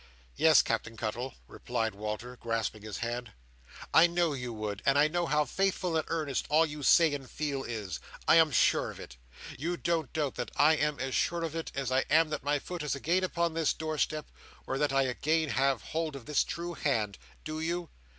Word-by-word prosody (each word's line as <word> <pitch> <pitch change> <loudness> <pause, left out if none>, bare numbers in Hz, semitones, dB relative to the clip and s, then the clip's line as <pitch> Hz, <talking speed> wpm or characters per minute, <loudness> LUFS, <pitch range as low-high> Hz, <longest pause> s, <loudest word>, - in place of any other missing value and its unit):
"Yes, - - +6
Captain 115 +1 -2
Cuttle," 120 +4 -3
replied 110 - -2
Walter, 110 +4 -5
grasping 115 -3 -2
his 105 -3 -6
hand, 120 0 -4 0.6
"I 165 +2 +8
know 170 -2 +1
you 125 -3 -4
would, 105 -2 -4
and 140 0 +3
I 150 +1 +6
know 175 +2 -1
how 150 0 +2
faithful 185 +2 0
and 160 - +2
earnest 155 -5 -2
all 155 +2 +5
you 150 -1 -7
say 160 +2 +5
and 135 -3 -5
feel 145 -3 -2
is. 105 - -5 0.3
I - - +7
am 160 -1 +6
sure 130 - +3
of - - -9
it. - - -10 0.4
You 170 +4 -2
don't 170 -4 -1
doubt 150 -4 -1
that 120 - -3
I 150 +2 +5
am 150 -1 0
as 135 -1 -3
sure 170 -1 0
of 165 -1 -3
it 165 - -4
as 135 -2 -2
I 130 - +4
am 155 +2 +4
that 150 - -2
my 145 +1 +1
foot 175 +4 -6
is 150 -1 -1
again 170 +7 +1
upon 170 -2 0
this 165 -1 +1
door 155 -1 -4
step, 155 +3 -1 0.3
or 135 - -2
that 150 -2 +2
I 135 0 +3
again 155 +5 0
have 135 -1 +1
hold 160 -2 -3
of 130 -4 -9
this 150 - +2
true 175 +1 -5
hand. 110 - -1 0.2
Do 155 0 -4
you?" 170 +1 -3
150 Hz, 210 wpm, -30 LUFS, 125-160 Hz, 0.6 s, I